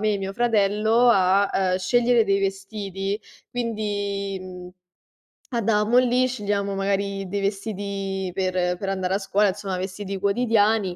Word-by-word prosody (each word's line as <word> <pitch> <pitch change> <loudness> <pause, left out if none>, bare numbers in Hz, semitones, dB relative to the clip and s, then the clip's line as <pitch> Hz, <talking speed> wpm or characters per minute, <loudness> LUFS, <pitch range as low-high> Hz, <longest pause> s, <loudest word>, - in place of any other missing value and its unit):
me 215 -1 +1
e - - -2
mio 195 0 -4
fratello 220 +1 +2
a, 195 0 +4
ehm, 185 -1 +1
scegliere 235 +4 +3
dei 195 0 +1
vestiti. 195 0 -3 0.3
Quindi, 205 -4 -2
mhmm, 180 -1 -9 0.8
andavamo 225 -1 +2
lì, 255 0 +3
scegliamo 205 -4 -2
magari 195 0 -1
dei 200 +2 -2
vestiti 195 -2 -3
per 180 -1 0
per 195 - -4
andare 190 -1 -1
a - - +2
scuola, 205 +1 +1
insomma 190 -1 -3
vestiti 190 +1 -5
quotidiani, 210 -2 +2
200 Hz, 135 wpm, -24 LUFS, 195-215 Hz, 0.8 s, a